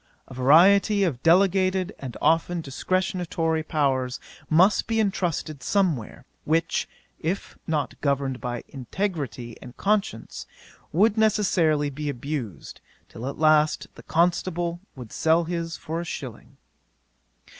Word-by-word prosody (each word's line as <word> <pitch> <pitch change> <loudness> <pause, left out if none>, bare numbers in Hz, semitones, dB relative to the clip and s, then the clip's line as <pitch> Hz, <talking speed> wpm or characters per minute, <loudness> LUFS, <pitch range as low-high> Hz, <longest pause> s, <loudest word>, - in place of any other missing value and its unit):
A - - -11
variety 190 - +5
of 145 -10 -1
delegated, 185 +2 +3
and 130 -4 -7
often 165 +2 +2
discretionary, 165 +1 -1
powers 135 -5 0 0.3
must 180 +6 +4
be 225 0 0
entrusted 175 -8 -1
somewhere; 155 - -1 0.2
which, 160 +2 0 0.3
if 180 +5 -3
not 155 -3 -2
governed 140 -2 -1
by 120 -1 -4
integrity 135 - -4
and 125 -1 -12
conscience, 200 - -1 0.4
would 210 +6 +3
necessarily 175 -9 +2
be 150 +2 -4
abused, 125 - -5 0.3
till 120 +3 -7
at - - -7
last 155 0 +3
the - - -13
constable 175 0 0 0.2
would 125 -5 -10
sell 160 +1 +2
his 165 -1 -4
for 165 +2 -4
a - - -4
shilling. 130 -8 -8
160 Hz, 120 wpm, -25 LUFS, 140-185 Hz, 0.4 s, variety